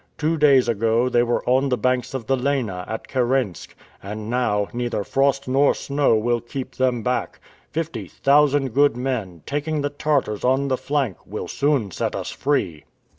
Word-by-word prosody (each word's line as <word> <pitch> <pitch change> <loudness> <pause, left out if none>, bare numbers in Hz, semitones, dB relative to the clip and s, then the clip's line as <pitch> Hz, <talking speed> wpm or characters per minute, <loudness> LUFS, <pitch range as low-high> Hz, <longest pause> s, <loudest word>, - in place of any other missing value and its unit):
Two 160 +2 0
days 140 -5 +5
ago, 115 +2 +1
they 120 -1 +3
were 120 0 -1
on 130 +2 +3
the 125 - +1
banks 125 +3 0
of 125 -4 -4
the 135 - +2
Lena, 125 -9 -1
at 110 - -5
Kirensk, 125 -6 -1 0.3
and 105 +2 -6
now, 105 -5 +1
neither 120 -3 -2
frost 135 +3 +1
nor 135 +2 +3
snow 140 -4 +1
will 120 +2 +1
keep 130 +2 -6
them 125 -3 0
back. 125 +2 -2 0.3
Fifty 165 +1 -4
thousand 145 -1 +3
good 140 -2 +3
men, 115 -10 -3
taking 150 +1 -2
the 145 0 -2
Tartars 145 -8 -1
on 135 +2 +2
the 130 - +2
flank, 135 - -1
will - - -5
soon 140 -8 0
set - - -2
us - - -4
free." 95 - -1
130 Hz, 175 wpm, -22 LUFS, 115-140 Hz, 0.3 s, days